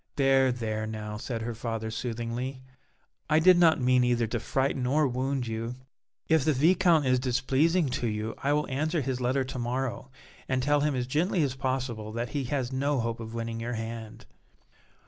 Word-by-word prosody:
"There, 135 -1 +4
there 110 -3 -3
now," 105 -1 -5
said 115 +1 -4
her 120 +1 -3
father, 115 -1 -4
soothingly; 120 +3 -4 0.7
"I 155 - +4
did 180 +3 +7
not 165 -3 +5
mean 125 0 +3
either 120 -1 +2
to 115 +2 -2
frighten 130 +2 -1
or 150 +3 +3
wound 130 +1 -1
you. 115 +1 -4 0.5
If 160 -3 +3
the 155 +1 +3
Viscount 165 +2 +4
is 130 -1 +3
displeasing 135 +7 +2
to 125 -1 -1
you 110 0 -3
I 140 - 0
will 150 0 0
answer 155 +5 -1
his 130 -1 -2
letter 130 +2 +1
to 130 0 -6
morrow 125 +2 -3 0.4
and 130 -1 +1
tell 145 +2 +3
him 145 -1 +1
as 125 -1 -1
gently 160 +6 +1
as 135 -3 0
possible 130 -5 -3
that 115 +1 -3
he 140 -3 -2
has 130 -1 -2
no 140 +1 0
hope 115 0 -2
of 115 0 -7
winning 115 0 -3
your 120 +1 -3
hand." 115 0 -6
130 Hz, 185 wpm, -28 LUFS, 115-140 Hz, 0.7 s, did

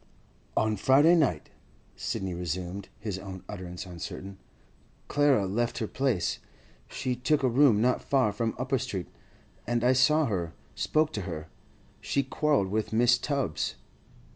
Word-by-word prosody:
'On 110 -1 +2
Friday 145 +6 +5
night,' 140 - +1 0.4
Sidney 95 -2 -3
resumed, 90 +3 -4
his 105 -3 -4
own 95 -1 -8
utterance 90 -3 -7
uncertain, 95 +2 -7 0.7
'Clara 145 -8 +3
left 115 +5 -1
her 115 - -1
place. 120 -7 0 0.5
She 130 -1 -2
took 140 +4 +1
a - - +4
room 120 -3 +4
not 125 +1 +2
far 130 -6 +2
from 110 +2 -2
Upper 130 +1 0
Street, 100 -9 -4 0.6
and 120 0 0
I 125 +1 +5
saw 150 +5 +4
her, 85 -8 -2 0.2
spoke 155 - +1
to - - -2
her. 80 -1 -6 0.5
She'd 140 -2 -1
quarrelled 145 -11 +2
with 110 +2 -1
Mrs. 120 +2 +3
Tubbs. 140 - -1
115 Hz, 140 wpm, -28 LUFS, 95-135 Hz, 0.7 s, Friday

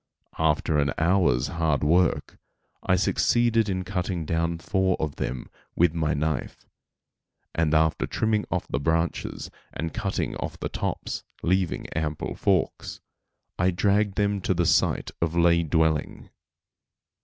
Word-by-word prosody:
After 75 -1 +2
an 70 -1 +1
hour's 85 -7 +3
hard 80 -5 0
work, 85 +4 +2 0.4
I 90 - +2
succeeded 115 +3 +2
in 95 -1 -1
cutting 90 -2 -3
down 85 +1 0
four 95 +2 0
of 75 -2 -3
them 65 -1 -4 0.3
with 85 -1 +3
my 80 -1 0
knife; 75 +2 -3 0.9
and 80 -2 +1
after 80 0 +2
trimming 110 -1 0
off - - -2
the - - -2
branches 80 +3 -1 0.2
and 80 0 -4
cutting 100 -4 -2
off - - -5
the - - -3
tops, - - -3 0.2
leaving 95 0 0
ample 75 -1 -3
forks, - - -1 0.6
I 90 +1 +3
dragged 100 +2 +1
them 100 -1 0
to 95 - 0
the 85 0 +1
site - - +2
of 85 0 0
lay 85 0 +4
dwelling. 80 -1 0
85 Hz, 135 wpm, -26 LUFS, 80-95 Hz, 0.9 s, lay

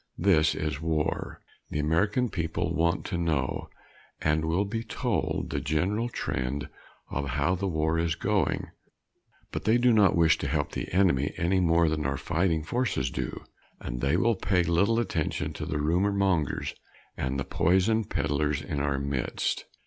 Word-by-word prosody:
This 80 -5 +3
is 75 -2 -3
war. 80 -2 -2 0.3
The - - -3
American 100 +11 +1
people 85 -1 -2
want 85 +1 +1
to 90 -3 -2
know, 75 -6 -1 0.5
and 80 +1 +1
will 85 +5 +1
be 115 +3 -3
told, - - -2
the - - -1
general 100 +10 0
trend 65 - -3 0.4
of 70 -1 -2
how 70 +6 +1
the 95 +2 -1
war 80 -1 0
is 80 -1 0
going. 100 -3 0 0.8
But - - -4
they 110 +3 +4
do 120 0 +4
not 100 -5 +5
wish 80 -4 +4
to - - -2
help - - -1
the - - -5
enemy 85 -7 +2
any 95 +1 +2
more 85 -1 +3
than 75 -2 0
our 70 0 -1
fighting 80 0 0
forces 95 - -1
do, 65 -2 -4 0.4
and - - -5
they 70 +5 +2
will 115 +5 +3
pay 95 -2 +1
little 100 +7 +2
attention 90 -9 -2
to 75 - -5
the 80 -2 -2
rumor 85 +7 +2
mongers 95 -7 0 0.4
and 65 +1 -2
the 65 - -2
poison 95 +6 +2
peddlers 75 -4 0
in 70 0 -4
our 70 -1 0
midst. 70 -2 -2
80 Hz, 165 wpm, -28 LUFS, 75-95 Hz, 0.8 s, not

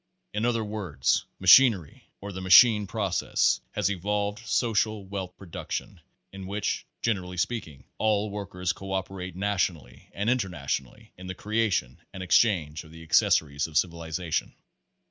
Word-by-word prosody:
In 105 +2 -1
other 115 -2 +1
words, 95 -11 -1
machinery 95 - +5
or 100 +1 -6
the 95 0 -7
Machine 105 +2 +7
Process 100 -3 0
has - - 0
evolved 100 +2 -2
Social 110 -3 0
Wealth 95 -2 -6
Production, 90 -4 -6 0.3
in 95 -1 -8
which, 100 +1 -2 0.2
generally 90 -5 -1
speaking, 85 - -3 0.2
all 105 -1 +1
workers 90 -3 -3
co 95 0 -7
operate 95 -2 -4
nationally 90 -10 -2
and 100 +3 -3
inter 120 -5 +1
nationally 70 -5 -5
in 90 0 -10
the 95 - -5
creation 100 - -1
and 95 -1 -6
exchange 90 -6 +2
of 80 - -15
the 80 0 -12
acces - - +4
sories 70 -1 -4
.of 80 -1 -3
civilization. 85 -1 -2
95 Hz, 145 wpm, -27 LUFS, 85-105 Hz, 0.3 s, Machine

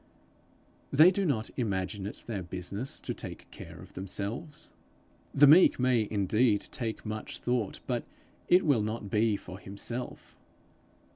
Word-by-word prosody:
They 155 +6 +7
do 195 +1 -1
not 115 -9 -1
imagine 100 -3 -2
it 105 - -9
their 105 -5 -4
business 95 +7 -4
to - - -3
take - - -9
care - - -10
of - - -13
themselves. 100 - -4 0.6
The 145 - +6
meek 155 +3 +7
man 130 0 +3
may 110 -3 +2
indeed 105 +2 +2
take 115 -2 -4
much 110 0 -5
thought, 120 -5 -2
but - - -1 0.4
it 180 +1 +5
will 140 -8 +3
not 105 -1 -4
be 110 -1 +2
for 90 0 -10
himself. 110 +6 -5
110 Hz, 145 wpm, -30 LUFS, 100-130 Hz, 0.6 s, They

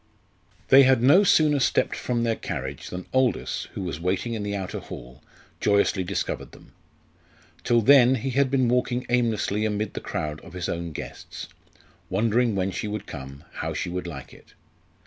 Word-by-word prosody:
They 135 - +9
had 130 -3 +4
no 150 +10 +7
sooner 155 -7 +4
stepped 125 - +1
from 120 -2 -1
their 115 -1 +1
carriage 65 -6 -5
than 90 0 -6
Aldous, 130 -2 0
who 95 - -4
was 85 -4 -4
waiting 95 +7 -1
in 110 - -3
the 100 0 -3
outer 95 -2 -4
hall, 60 +1 -10 0.4
joyously 100 -1 +2
discovered 90 0 -3
them. - - -16 0.9
Till 120 -1 +3
then 130 +1 +6
he 130 +2 -3
had 135 +1 +2
been 130 -2 +2
walking 125 +1 0
aimlessly 115 -4 +1
amid 105 0 -1
the - - -5
crowd 75 0 -4
of 95 - -13
his 90 -2 -4
own 85 -1 -3
guests, - - -8 0.6
wondering 115 +3 +1
when 95 0 0
she 105 - -4
would 105 +1 -4
come, 70 -1 -9
how - - -3
she 90 - -2
would 90 0 -4
like 70 -6 -8
it. - - -19
105 Hz, 175 wpm, -25 LUFS, 90-125 Hz, 0.9 s, They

